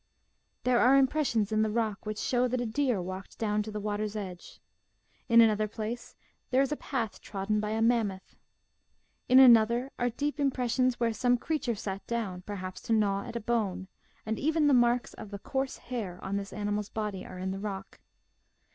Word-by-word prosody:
There 250 -1 +3
are 260 +3 +6
impressions 260 -6 +2
in 215 0 +2
the 220 - +2
rock 215 -2 -2
which 215 0 -3
show 250 +2 +1
that 250 +1 -1
a 245 - -1
deer 245 -1 0
walked 185 +2 -7
down 210 -1 0
to 215 - -5
that 210 - -4
water's 210 0 -3
edge. 185 -4 -7 0.7
In 230 0 +8
another 215 -1 +3
place 220 +3 -6 0.3
there 260 +1 +4
is 275 - -2
a - - +1
path 235 -8 -4
trodden 205 +1 -2
by 210 0 -2
a 220 +1 0
Mammoth. 220 -5 0 0.9
In 255 - +7
another 240 0 +6
are 245 - +2
deep 290 +5 -3
impressions 255 -2 +1
where 230 -1 +1
some 245 +2 +2
creature 265 -4 -2
sat 195 -1 -5
down, 210 -6 -3
perhaps 185 -1 -6
to 230 - -1
gnaw 200 -2 +1
at - - -8
a - - -1
bone, 210 -5 -1 0.4
and 220 +1 -2
even 310 +2 +2
the 290 - +5
marks 240 0 +3
of 215 - -9
the 200 - -6
coarse 265 +6 -3
hair 215 -8 -5
on 195 +1 -3
this 200 0 -4
animal's 205 0 -2
body 210 -3 -4
are 185 - -9
in 185 +1 -3
the 195 - -4
rock. 195 -1 -6
220 Hz, 190 wpm, -29 LUFS, 205-245 Hz, 0.9 s, In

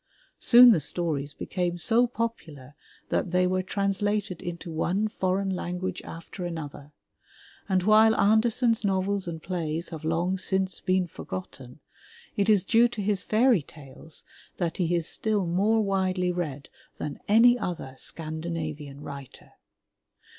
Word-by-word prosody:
Soon 245 0 +8
the 195 - +4
stories 150 -2 -2
became 175 -2 -2
so 230 +8 +3
popular 170 - -5 0.4
that - - 0
they 180 +1 +2
were 185 +1 +1
translated 200 0 -1
into 170 -1 -6
one 180 +6 0
foreign 195 -2 -1
language 180 +1 -4
after 170 +3 -9
another, 150 -4 -6 0.8
and 185 -1 +2
while 220 +2 +5
Andersen's 225 +3 +3
novels 195 -1 0
and 165 -1 -6
plays 170 -2 -3
have 160 -2 -8
long 170 +4 0
since 190 -1 0
been 185 0 +1
forgotten, 125 - -9 0.5
it 205 -1 +1
is 205 -4 +5
due 230 +4 +4
to 235 -2 -8
his 200 -2 +1
fairy 225 -2 +3
tales 145 +1 -9 0.3
that 170 -3 -2
he 175 -1 +1
is 170 -1 0
still 210 -3 -1
more 200 +6 +2
widely 185 -2 0
read 150 -6 -4 0.3
than 145 -2 -5
any 230 +4 +6
other 170 - -4
Scandinavian 155 -2 -5
writer. 140 -2 -10
180 Hz, 135 wpm, -26 LUFS, 160-205 Hz, 0.8 s, Soon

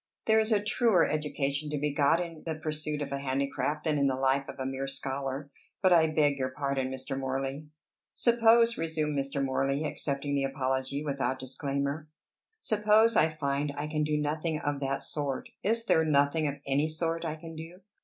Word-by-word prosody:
There 220 0 +5
is 220 +1 +1
a 210 - +4
truer 220 -5 +3
education 150 -1 -1
to 150 - -2
be 145 0 -1
got 145 +3 +3
in 165 -3 -5
the 160 -1 -3
pursuit 155 -1 -3
of 140 - -7
a 140 - -2
handicraft 140 +2 -1
than 155 -3 +1
in 140 - +3
the 130 - +1
life 135 +1 +1
of - - -8
a 130 - -3
mere 135 +1 -3
scholar. 135 +1 -4 0.3
But 185 -2 +4
I 160 -2 +6
beg 150 -3 +2
your 130 0 0
pardon, 135 -1 -2
Mr. 130 0 -4
Morley." 135 +2 -3 0.4
"Suppose," 235 0 +4
resumed 155 -2 -1
Mr. 140 0 -1
Morley, 135 +2 0
accepting 145 -1 -2
the 140 -1 +1
apology 135 +1 -1
without 140 -2 -1
disclaimer, 140 +3 -3 0.5
"Suppose 215 - +3
I 160 - +5
find 145 -1 -2
I 145 - -2
can 150 0 -1
do 150 0 +1
nothing 155 +2 -1
of 145 -1 -2
that 135 0 -2
sort; 145 -3 -3
is 230 +2 0
there 160 - +4
nothing 150 +1 +2
of 140 - -2
any 140 +3 +1
sort 165 +1 -2
I 160 -2 -2
can 165 0 -10
do?" 165 +4 -9
145 Hz, 190 wpm, -29 LUFS, 140-160 Hz, 0.5 s, I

